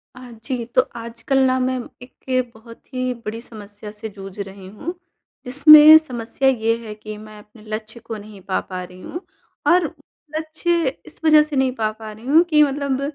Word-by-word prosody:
हाँ 250 -1 -11
जी, 245 -1 -3
तो 245 +2 +3
आजकल 235 +3 -2
ना 260 0 +2
मैं 255 0 0 0.2
एक 255 0 -3
बहुत 230 +1 -15
ही 255 0 -1
बड़ी 220 +2 -4
समस्या 210 -2 -11
से 215 +1 -8
जूझ 195 -1 -11
रही 195 -1 -8
हूँ। 215 - -6 0.5
जिसमें 305 +4 +9
समस्या 255 -2 -2
ये 230 -3 +1
है 215 - -6
कि 215 0 -9
मैं 215 0 -12
अपने 210 +1 -18
लक्ष्य 220 +2 -6
को 225 -1 -7
नहीं 205 -1 -12
पा, 185 +1 -1
पा 185 -1 -6
रही 180 0 -12
हूँ 345 - -7 0.5
और 355 0 +5 0.5
लक्ष्य 320 +1 -1 0.2
इस - - -14
वज़ह 310 -1 +7
से 300 -1 -6
नहीं 265 -1 +2
पा, 215 -3 -1
पा 215 0 -10
रही 215 +2 -13
हूँ 310 +6 +5
कि 300 -2 +6
मतलब 280 -1 -1
235 Hz, 185 wpm, -21 LUFS, 215-270 Hz, 0.5 s, जिसमें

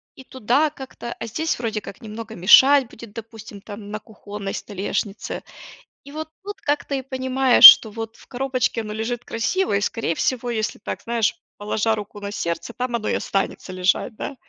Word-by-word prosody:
и 265 - -12
туда 260 +5 +1
как-то, 265 -4 -8
а - - -5
здесь 315 +8 -2
вроде 225 -3 -2
как 195 - -11
немного 220 0 -8
мешать 260 +8 +6
будет, 230 -2 -12
допустим, 220 -2 -10
там 205 0 -9
на 215 - -4
кухонной 205 -2 -8
столешнице. 205 +1 -4 0.6
И 280 - -13
вот 315 +1 -6 0.2
тут 410 0 -8
как-то 290 -1 -1
и 270 - -2
понимаешь, 260 -1 +4
что 220 - -9
вот 225 +1 -7
в - - -18
коробочке 255 -2 -1
оно 210 -1 -6
лежит 235 +2 -3
красиво 230 - -1
и, 200 - +1
скорее 215 -5 -1
всего, 245 +4 -1
если 220 -1 -2
так, - - -5
знаешь, 230 -2 0 0.2
положа 215 +2 0
руку 205 -1 -8
на 200 0 -5
сердце, 170 +5 -4
там 250 -1 -3
оно 220 -2 -3
и - - +1
останется 195 -1 -3
лежать, 185 +5 0
да. 275 - -6
225 Hz, 180 wpm, -22 LUFS, 210-260 Hz, 0.6 s, мешать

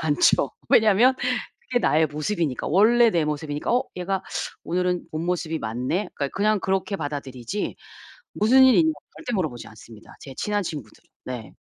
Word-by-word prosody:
않죠. 150 -2 +3 0.2
왜냐면 220 +4 +5 0.5
그게 250 -1 -1
나의 160 +1 +3
모습이니까. 150 -1 -2
원래 230 +7 +5
내 170 -6 +1
모습이니까. 150 +4 -2
'어 250 - +3
얘가 185 +1 -2 0.4
오늘은 180 +1 -1
본모습이 165 0 -2
맞네.' 125 - -2
그러니까 140 -1 -2
그냥 210 +1 +2
그렇게 195 +1 -1
받아들이지 145 - -4 0.6
무슨 255 +5 +5
일이 260 -2 +6
있냐고 320 -1 +2 0.2
절대 245 -7 -4
물어보지 155 - -3
않습니다, 110 0 -15
제 135 - -10
친한 205 -1 0
친구들은. 145 - -7 0.2
네. 125 -4 -6
175 Hz, 375 characters per minute, -24 LUFS, 145-210 Hz, 0.6 s, 일이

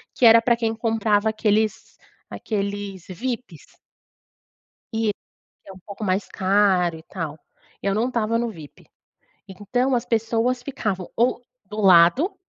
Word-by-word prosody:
que 250 - +3
era 230 0 +8
para 235 +1 +3
quem 225 -1 -2
comprava 220 -2 +1
aqueles 215 -1 -1 0.3
aqueles 200 -3 -4
VIPs. 230 - -6 1.2
Eh, 220 -1 +1 0.5
que - - -14
é - - -8
um 190 - -13
pouco 205 +1 -7
mais 190 0 0
caro 190 -3 +2
e 160 - -12
tal. 165 -5 -6 0.4
Eu 195 0 0
não 230 +4 +1
estava 230 -2 0
no 235 0 -1
VIP. 155 -8 -13 0.6
Então 245 +7 -1
as 240 - 0
pessoas 230 +2 0
ficavam 215 -10 -4
ou 240 +1 +1 0.2
do 210 +2 -6
lado, 195 - +5
215 Hz, 140 wpm, -23 LUFS, 195-230 Hz, 1.2 s, era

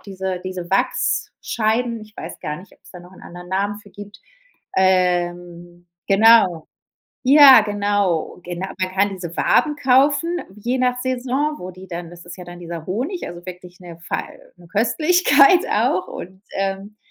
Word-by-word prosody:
diese 190 -2 -5
diese 185 -2 -6
Wachsscheiben. 225 +4 -1
Ich 215 0 -16
weiß 165 - -8
gar 150 - -4
nicht, 185 +5 -14
ob's - - -20
da 180 - -11
noch 180 +1 -16
'n - - -16
anderen 175 +1 -11
Namen 200 +2 -2
für 205 -1 -17
gibt. 205 +1 -12 0.6
Ähm, 175 -2 0 0.2
genau. 195 -5 +5 0.6
Ja, 270 -3 +8
genau. 205 -5 -1
Genau. 180 +2 -5
Man 185 0 -1
kann 200 +1 +2
diese 180 -3 -7
Waben 300 -1 +2
kaufen, 285 +5 +2 0.2
je 240 +5 -2
nach 250 0 +1
Saison, 260 +4 -1
wo 180 - -7
die 185 +1 -13
dann 170 -1 -7
das 175 -1 -14
ist 175 0 -9
ja 180 - -10
dann 175 0 -11
dieser 170 -2 -7
Honig, 265 - -3
also, 175 +1 -10
wirklich 180 0 -11
'ne 170 -2 -12
fei - - -5 0.2
'ne 175 -1 -17
Köstlichkeit 345 - +4
auch - - +1
und 185 +2 -10 0.2
ähm, 195 +2 -3
195 Hz, 160 wpm, -20 LUFS, 175-235 Hz, 0.6 s, Ja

